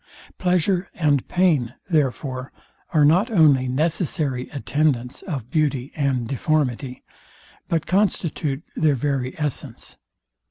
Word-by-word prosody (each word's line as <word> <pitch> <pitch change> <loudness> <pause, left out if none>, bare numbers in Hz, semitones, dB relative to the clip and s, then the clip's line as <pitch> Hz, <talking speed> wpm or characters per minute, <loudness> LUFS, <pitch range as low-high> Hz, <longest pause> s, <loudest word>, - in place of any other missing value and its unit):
Pleasure 180 +1 +1
and 145 -5 +1
pain, 155 -10 +2
therefore, 135 -4 -1 0.4
are 150 -3 +4
not 180 - +4
only 150 - +4
necessary 145 -2 -1
attendants 140 -3 -1
of 135 - -5
beauty 145 -4 0
and 135 -5 0
deformity, 135 -1 -1 0.6
but 165 -2 0
constitute 165 -7 0
their 155 -3 +3
very 130 -1 -2
essence. 150 -3 -5
145 Hz, 105 wpm, -23 LUFS, 130-160 Hz, 0.6 s, are